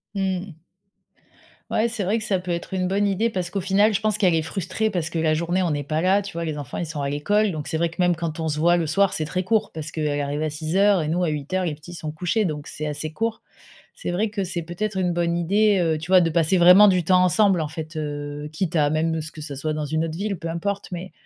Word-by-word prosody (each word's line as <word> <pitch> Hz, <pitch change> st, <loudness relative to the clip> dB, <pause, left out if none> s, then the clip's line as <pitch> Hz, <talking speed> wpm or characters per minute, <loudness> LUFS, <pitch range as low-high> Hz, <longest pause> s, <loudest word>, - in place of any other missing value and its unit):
Mmh. 190 Hz, -2 st, -2 dB, 1.2 s
Ouais, 225 Hz, +2 st, +2 dB
c'est 225 Hz, -3 st, -3 dB
vrai 205 Hz, +5 st, +1 dB
que 215 Hz, -, -6 dB
ça 190 Hz, -3 st, +1 dB
peut 180 Hz, -1 st, -5 dB
être 170 Hz, +2 st, -4 dB
une 185 Hz, -1 st, 0 dB
bonne 200 Hz, +1 st, +1 dB
idée 215 Hz, +4 st, +1 dB
parce 185 Hz, -4 st, -3 dB
qu'au 195 Hz, +1 st, -2 dB
final 200 Hz, +4 st, +3 dB
je 220 Hz, -, 0 dB
pense 215 Hz, -1 st, +1 dB
qu'elle 185 Hz, -5 st, +3 dB
est 160 Hz, -, +2 dB
frustrée 190 Hz, +6 st, -2 dB
parce 170 Hz, -5 st, -2 dB
que 165 Hz, -, -4 dB
la 160 Hz, -1 st, +2 dB
journée 170 Hz, +4 st, 0 dB
on 170 Hz, -, 0 dB
n'est 145 Hz, -1 st, -1 dB
pas 155 Hz, +2 st, -1 dB
là 195 Hz, +3 st, +3 dB
tu 195 Hz, 0 st, -8 dB
vois? 170 Hz, 0 st, -3 dB
Les 155 Hz, -2 st, -3 dB
enfants, 145 Hz, -4 st, -6 dB
ils 175 Hz, -, -2 dB
sont 155 Hz, -2 st, -6 dB
à 140 Hz, -, -1 dB
l'école. 205 Hz, +8 st, +1 dB
Donc 155 Hz, -2 st, -5 dB
c'est 160 Hz, -, -1 dB
vrai 170 Hz, +1 st, +1 dB
que -, -, -14 dB
même 175 Hz, -1 st, +3 dB
quand 165 Hz, -1 st, -4 dB
on 160 Hz, -, -1 dB
se 150 Hz, 0 st, -2 dB
voit 175 Hz, +2 st, +4 dB
le 170 Hz, -2 st, 0 dB
soir, 195 Hz, +5 st, +2 dB
c'est 155 Hz, -, -2 dB
très 185 Hz, +4 st, -2 dB
court 220 Hz, +2 st, +1 dB
parce 155 Hz, -1 st, -6 dB
qu'elle 150 Hz, -2 st, -1 dB
arrive 145 Hz, +1 st, -2 dB
à 155 Hz, -, 0 dB
6:00 175 Hz, +5 st, +2 dB
et 150 Hz, -, -2 dB
nous 175 Hz, +3 st, 0 dB
à 165 Hz, -, +1 dB
8:00, 155 Hz, +6 st, -2 dB
les 160 Hz, -, -1 dB
petits 160 Hz, +4 st, -11 dB
sont 155 Hz, -3 st, -5 dB
couchés, 180 Hz, +7 st, 0 dB
donc 150 Hz, -3 st, -4 dB
c'est 155 Hz, -, -6 dB
assez 150 Hz, +1 st, -4 dB
court. 225 Hz, +3 st, -2 dB, 0.5 s
C'est -, -, -4 dB
vrai 210 Hz, +4 st, 0 dB
que 200 Hz, -2 st, -2 dB
c'est 175 Hz, -2 st, -4 dB
peut-être 190 Hz, +5 st, -4 dB
une 180 Hz, -2 st, +1 dB
bonne 170 Hz, 0 st, 0 dB
idée, 200 Hz, +4 st, +3 dB
heu, 160 Hz, -2 st, +1 dB
tu 165 Hz, +4 st, -8 dB
vois, 185 Hz, -, +8 dB
de 165 Hz, -1 st, +2 dB
passer 170 Hz, +2 st, +2 dB
vraiment 180 Hz, +4 st, +8 dB
du 180 Hz, -2 st, +3 dB
temps 185 Hz, +1 st, +4 dB
ensemble, 190 Hz, 0 st, +3 dB
en 155 Hz, -, -2 dB
fait, 155 Hz, +1 st, -7 dB
heu, 145 Hz, 0 st, -4 dB
quitte 170 Hz, +1 st, -2 dB
à 145 Hz, -1 st, +4 dB
même, 160 Hz, +1 st, +1 dB
heu, 160 Hz, -, -2 dB
ce 160 Hz, +1 st, -7 dB
que 155 Hz, -, -10 dB
ce 145 Hz, -2 st, -6 dB
soit 155 Hz, +3 st, -2 dB
dans 150 Hz, 0 st, -3 dB
une 155 Hz, +2 st, -1 dB
autre 160 Hz, -1 st, -4 dB
ville, 200 Hz, -1 st, -2 dB
peu 165 Hz, -, -5 dB
importe. 200 Hz, +5 st, -3 dB
Mais 180 Hz, +2 st, -6 dB
170 Hz, 285 wpm, -23 LUFS, 155-190 Hz, 1.2 s, vois